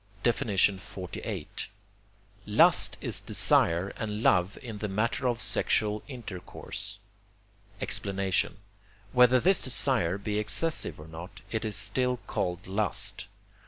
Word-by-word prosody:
XLVIII. 95 Hz, -4 st, -1 dB, 1.0 s
Lust -, -, +4 dB
is -, -, -2 dB
desire 85 Hz, +4 st, +2 dB
and 105 Hz, 0 st, -4 dB
love 90 Hz, 0 st, +2 dB
in 110 Hz, -4 st, -7 dB
the 105 Hz, -, -3 dB
matter 110 Hz, +6 st, -1 dB
of 120 Hz, -1 st, -1 dB
sexual 105 Hz, -3 st, +1 dB
intercourse. 100 Hz, -4 st, -7 dB, 0.8 s
Explanation 95 Hz, -3 st, +1 dB, 0.5 s
Whether 125 Hz, 0 st, +5 dB
this 185 Hz, +7 st, +3 dB
desire 120 Hz, -8 st, +2 dB
be 105 Hz, +1 st, -2 dB
excessive 130 Hz, -, +1 dB
or 75 Hz, -, -11 dB
not, 80 Hz, +3 st, -10 dB
it 110 Hz, 0 st, -2 dB
is 110 Hz, -2 st, -2 dB
still 125 Hz, +3 st, +2 dB
called 90 Hz, +1 st, -3 dB
lust. 100 Hz, +1 st, -1 dB
105 Hz, 110 wpm, -28 LUFS, 95-120 Hz, 1.0 s, Whether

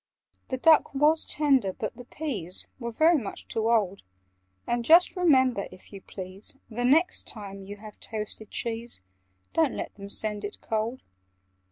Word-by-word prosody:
"The 260 Hz, -, -2 dB
duck 315 Hz, 0 st, +5 dB
was 300 Hz, +3 st, +4 dB
tender, 270 Hz, -10 st, +2 dB
but 215 Hz, -, -4 dB
the 245 Hz, -, -11 dB
peas 215 Hz, -, -4 dB
Were 235 Hz, -2 st, -3 dB
very 315 Hz, +6 st, +4 dB
much 210 Hz, -5 st, -7 dB
too 225 Hz, 0 st, 0 dB
old: 200 Hz, -4 st, +2 dB, 0.6 s
And 240 Hz, 0 st, 0 dB
just 335 Hz, +9 st, +6 dB
remember, 260 Hz, -, +3 dB
if 185 Hz, -, -15 dB
you 195 Hz, -, -8 dB
please, 190 Hz, +7 st, -7 dB
The 245 Hz, +2 st, -1 dB
next 320 Hz, +8 st, +3 dB
time 200 Hz, -3 st, -7 dB
you 200 Hz, +1 st, -8 dB
have 210 Hz, 0 st, -12 dB
toasted 215 Hz, -1 st, -6 dB
cheese, 230 Hz, 0 st, -3 dB, 0.5 s
Don't 320 Hz, -5 st, +2 dB
let -, -, -5 dB
them 200 Hz, 0 st, -10 dB
send 210 Hz, 0 st, -1 dB
it 205 Hz, -, -6 dB
cold. 225 Hz, +3 st, -2 dB
230 Hz, 160 wpm, -27 LUFS, 205-275 Hz, 0.6 s, just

